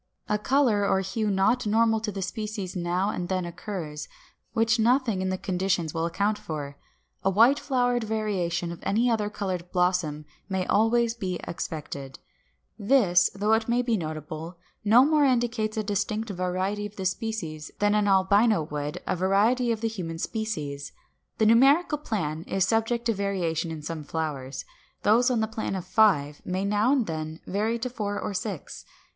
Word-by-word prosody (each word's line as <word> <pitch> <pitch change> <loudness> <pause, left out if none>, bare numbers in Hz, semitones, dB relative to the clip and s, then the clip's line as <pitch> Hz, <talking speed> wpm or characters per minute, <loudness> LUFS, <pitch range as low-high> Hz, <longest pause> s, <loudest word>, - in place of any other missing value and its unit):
A 210 0 0
color 235 -3 +2
or 190 -1 +2
hue 210 +3 -2
not 205 +5 +2
normal 225 +1 +3
to 215 -1 -3
the 195 -1 -4
species 210 -2 -4
now 180 +3 0
and 180 -3 -4
then 185 -1 -1
occurs, 165 -5 -6 0.5
which 225 0 +2
nothing 235 -3 +2
in 190 - -1
the 185 - -1
conditions 180 -4 -1
will 165 0 0
account 205 +5 0
for. 145 -3 -6 0.5
A 195 - +3
white 230 +9 +5
flowered 245 -3 +1
variation 190 -6 -1
of 170 - -8
any 235 +4 +1
other 210 -2 0
colored 185 -4 -4
blossom 180 -5 0 0.2
may 190 -1 -1
always 225 +2 +3
be 190 -6 -3
expected; 145 -5 -6 0.6
this, 200 -5 +4
though 210 +2 +2
it 225 +1 +1
may 240 +1 +2
be 235 -2 +1
notable, 155 0 -5 0.3
no 230 +5 +6
more 305 0 +3
indicates 235 -4 +1
a 215 - 0
distinct 210 +2 -2
variety 185 +3 -2
of 210 - -18
the 190 - -5
species 180 -6 -3
than 205 0 +2
an 210 -1 +2
albino 200 0 +4
would 150 -1 -5
a - - 0
variety 210 +7 +2
of 225 -1 -2
the 225 - +1
human 180 -7 -5
species. 155 -10 -4 0.4
The 220 - +3
numerical 275 +8 +5
plan 160 - -3
is 190 -1 +1
subject 225 +3 0
to 230 - +2
variation 180 -5 -1
in 160 -2 -6
some 160 0 -5
flowers; 145 -4 -4 0.4
those 235 +4 +4
on 240 -3 +1
the 220 - +1
plan 220 -2 -3
of 185 -2 -4
five 180 -8 +3
may 185 +2 -2
now 210 +5 +2
and 270 -5 +2
then 155 -1 -5
vary 215 +4 0
to 235 - -3
four 210 -4 -3
or - - -3
to 185 - 0
six. 195 -9 -6
200 Hz, 175 wpm, -26 LUFS, 175-225 Hz, 0.6 s, no